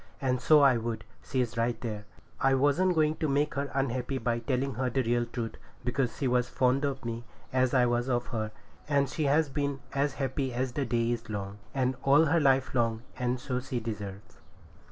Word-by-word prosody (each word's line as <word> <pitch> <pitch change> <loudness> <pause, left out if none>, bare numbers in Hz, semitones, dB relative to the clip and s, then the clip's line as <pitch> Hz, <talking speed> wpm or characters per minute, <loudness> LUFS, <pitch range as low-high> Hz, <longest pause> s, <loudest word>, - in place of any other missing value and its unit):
And 130 -2 0
so 150 +3 +6
I 135 -3 +6
would; 115 0 -3 0.2
she's 125 -4 -1
right 115 +1 0
there. 105 -3 -5 0.3
I 135 0 +4
wasn't 145 +7 +3
going 155 -1 +2
to 155 - 0
make 145 +1 +1
her 140 0 -2
unhappy 135 0 -1
by 120 -1 0
telling 130 +2 -1
her 125 +2 -1
the 130 +2 0
real 120 0 +1
truth, 115 -1 -5 0.3
because 125 -1 0
she 135 - 0
was 125 0 +2
as - - -17
fond 130 +2 +2
of 135 -2 -3
me 115 0 -4 0.3
as 130 0 +2
I 125 -1 +5
was 120 +1 0
of 120 -1 +1
her; 110 -2 -1 0.4
and 140 -1 +3
she 150 +3 -2
has 150 +3 +3
been 140 0 -2
as 140 0 +1
happy 135 -2 -2
as 130 +1 -1
the 140 +2 -1
day 120 0 +1
is 115 -2 -4
long, 100 -1 -5 0.4
all 140 +4 +5
her 165 +3 +3
life 135 -3 +3
long, 115 -2 +1 0.2
and 125 0 0
so 125 -1 -2
she 130 -1 -3
deserves. 105 -4 -7
130 Hz, 205 wpm, -29 LUFS, 120-140 Hz, 0.4 s, so